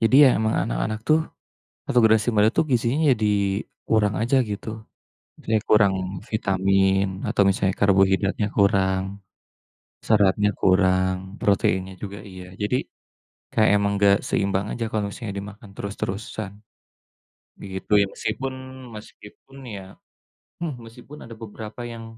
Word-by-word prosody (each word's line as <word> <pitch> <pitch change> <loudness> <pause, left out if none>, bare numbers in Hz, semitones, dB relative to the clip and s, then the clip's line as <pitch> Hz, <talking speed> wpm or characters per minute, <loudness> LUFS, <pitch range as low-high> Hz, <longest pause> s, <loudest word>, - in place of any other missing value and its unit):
Jadi 115 +2 +2
ya - - +8
emang 110 0 0
anak-anak 105 - -2
tuh 155 +1 +5 0.7
atau 125 - +3
generasi 110 +1 +4
muda 105 +1 +5
tuh - - +3
gizinya 125 +5 +1
jadi 110 -2 -2 0.6
kurang 105 -2 +2
aja 120 +4 +1
gitu. 105 +2 -5 0.7
Misalnya 110 -1 0
kurang 105 -3 +5 0.4
vitamin 95 -1 +2 0.2
atau 100 - +2
misalnya 95 0 +1
karbohidratnya 95 +1 +3
kurang, 95 -2 +3 1.0
seratnya 105 -1 +3
kurang, 95 0 +3 0.3
proteinnya 95 -1 +1
juga 100 -1 -6
iya. 95 0 -10 0.2
Jadi 105 +5 +1 0.8
kayak 110 -1 +3
emang 100 0 +1
enggak 100 0 +5
seimbang 100 0 0
aja 115 - -3
kalau 105 -2 -1
misalnya 105 -2 -7
dimakan 100 +2 -9
terus-terusan, 100 0 -5 1.1
begitu 95 +1 -8
ya. 100 - +3
Meskipun 135 0 -3 0.4
meskipun 105 +5 -14 0.2
ya 95 - -7 0.8
hmm, 155 -5 -3
meskipun 125 +6 -13
ada 115 - -10
beberapa 110 +2 -9
yang 115 0 -8
105 Hz, 125 wpm, -23 LUFS, 95-110 Hz, 1.1 s, ya